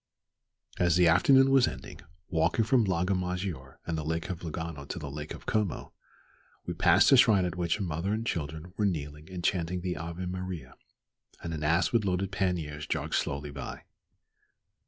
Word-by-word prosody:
As 90 -2 +3
the 90 -1 +5
afternoon 135 +10 +5
was 135 -2 +5
ending 65 0 -7 0.3
walking 85 +7 +1
from 120 -1 +3
Lago 95 0 +1
Maggiore 90 -7 -3
and 85 - -2
the 80 - -3
Lake 80 +4 -2
of 85 - -5
Lugano 80 -2 -5
to - - -6
the 75 -4 -6
Lake 75 +1 -6
of - - -14
Como 105 -5 -1 0.7
we - - -3
passed - - +5
a 135 - +8
shrine 105 -7 +5
at 90 -1 -3
which 85 0 0
a 105 - -3
mother 85 +2 -2
and 110 +2 -1
children 80 -1 -4
were 105 - +2
kneeling 75 -2 -4
and 90 -2 -6
chanting 90 0 0
the 90 0 -2
Ave 85 +3 -5
Maria, 90 -7 -5 0.7
and 85 - -4
an 75 - -4
ass 85 +3 +2
with 115 -2 +2
loaded 95 0 -1
panniers 85 -6 -2
jogged - - -2
slowly 70 +1 -1
by. 70 -2 -7
90 Hz, 180 wpm, -29 LUFS, 80-95 Hz, 0.7 s, a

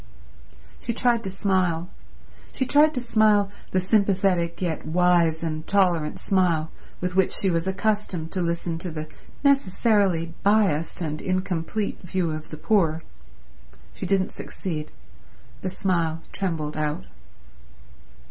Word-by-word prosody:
She 235 - -3
tried 235 -1 +2
to - - -2
smile; 185 -3 0 0.6
she 260 - -1
tried 300 +3 +4
to - - 0
smile 215 -4 +3 0.2
the 185 - +1
sympathetic 185 -3 +2
yet 170 -4 -2
wise 170 0 +2
and 155 -1 -3
tolerant 180 -6 +2
smile 170 -5 +1 0.3
with 180 0 -3
which 190 -1 +3
she 195 - +1
was 165 +1 0
accustomed 190 -4 -1
to 185 - -1
listen 170 -1 -2
to 180 - -5
the 155 -1 -5 0.4
necessarily 200 - +2
biased 195 -7 +2
and 155 -1 -3
incomplete 185 +2 -2
view 180 -2 -1
of 155 0 -6
the 155 - -7
poor. 165 -2 +1 0.9
She - - -5
didn't 195 -1 +1
succeed. 155 -5 -5 0.7
The 185 - -2
smile 170 -4 -1
trembled 160 -6 -2
out. 150 - -2
180 Hz, 130 wpm, -25 LUFS, 165-200 Hz, 0.9 s, tried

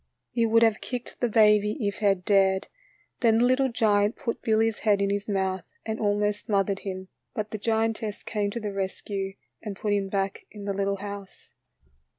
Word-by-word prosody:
He 230 -1 +2
would 230 +1 +5
have 225 -2 +3
kicked 250 -1 -6
the 245 - +1
baby 210 -1 +4
if 200 - -2
he 215 - -1
had 195 -2 +1
dared. 195 -2 +3 0.5
Then 225 -2 +4
the 235 - +4
little 260 +1 +3
giant 210 -2 +2
put 230 - -4
Billy's 220 0 +2
head 210 -2 +3
in 200 0 +1
his 200 0 -2
mouth 190 -2 -1
and 220 0 -3
almost 205 0 0
smoth 200 -2 +3
ered 195 0 -2
him, 190 -1 -6 0.3
but 215 -1 -3
the 215 - -4
giantess 220 0 -1
came 210 -2 -1
to 235 - -4
the 210 -2 -4
rescue 195 0 -3 0.3
and 210 -3 -5
put 210 +1 -1
him 200 -1 0
back 195 0 -2
in 205 -2 -9
the 200 - -1
little 200 0 0
house. 200 -1 -9
205 Hz, 195 wpm, -27 LUFS, 195-220 Hz, 0.5 s, would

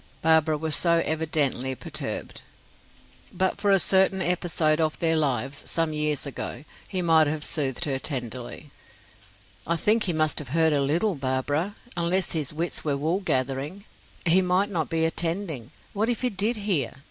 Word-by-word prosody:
Barbara 160 -1 +4
was 155 0 -2
so 170 -1 +2
evidently 150 -5 0
perturbed. - - -5 0.9
But 185 +1 -1
for 205 - +1
a 195 - +6
certain 190 0 +4
episode 170 -3 +1
of 155 -1 0
their 165 -1 +2
lives, 140 -1 0
some 165 -2 0
years 150 -1 -1
ago, 135 -1 -6 0.2
he 185 -2 -2
might 160 -2 +5
have 150 0 -2
soothed 145 +1 0
her 135 -3 -1
tenderly. 125 +1 -5 1.0
"I 170 - +1
think 215 +6 +2
he 175 - 0
must 155 -1 +1
have 145 -4 -8
heard 160 -1 +4
a 145 - +2
little, 165 +9 +1
Barbara, 145 +7 -2 0.2
unless 175 +2 +1
his 155 -5 -1
wits 165 +3 -3
were 145 -2 0
wool 160 +6 0
gathering. 140 +3 -2 0.4
He 175 +3 +5
might 185 +3 +1
not 165 -5 -1
be 160 0 +1
attending. 165 - -2 0.2
What 215 +3 0
if 240 - -1
he 250 -1 0
did 210 +4 0
hear? 190 - -1
160 Hz, 165 wpm, -25 LUFS, 145-180 Hz, 1.0 s, a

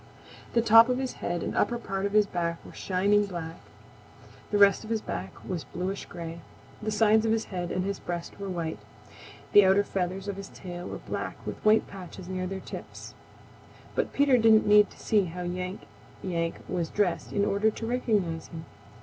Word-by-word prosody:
The 230 - +3
top 225 +1 +8
of 250 - +1
his 260 -1 -2
head 175 -1 -2
and - - -3
upper 240 - +2
part 195 -3 -2
of 200 - -7
his 210 -1 +5
back 170 -3 -3
were - - -11
shining 200 +2 +2
black. 170 -3 -6 0.9
The 205 - +1
rest 200 0 +5
of 215 - -9
his 225 -1 +1
back 95 - -5 0.2
was 175 -4 -3
bluish 190 +3 -4
gray. 170 -1 -7 0.4
The 215 - -2
sides 215 0 +4
of 225 - +1
his 225 0 +1
head 175 -1 -3
and 185 0 -1
his 200 0 -2
breast 175 +1 -5
were 200 -1 -4
white. 170 -3 -3 0.7
The 205 - +9
outer 190 +2 +5
feathers 190 0 -3
of 200 -1 -3
his 195 0 -7
tail 175 -1 -8
were - - -5
black - - -5
with - - -6
white 215 +1 +5
patches 185 -1 -10
near 185 0 -3
their 190 +1 -4
tips. - - -9 0.8
But - - -1
Peter 275 -3 +4
didn't 220 -1 +6
need 210 0 +6
to - - -17
see 210 -3 +2
how 180 +1 -6
Yank 180 +2 -4 0.4
Yank 170 -3 -1
was 175 -3 -2
dressed 180 -5 0
in 200 -1 +1
order 205 +2 +2
to 225 - -6
recognize 210 -9 0
him. 165 -1 -9
195 Hz, 195 wpm, -28 LUFS, 175-215 Hz, 0.9 s, The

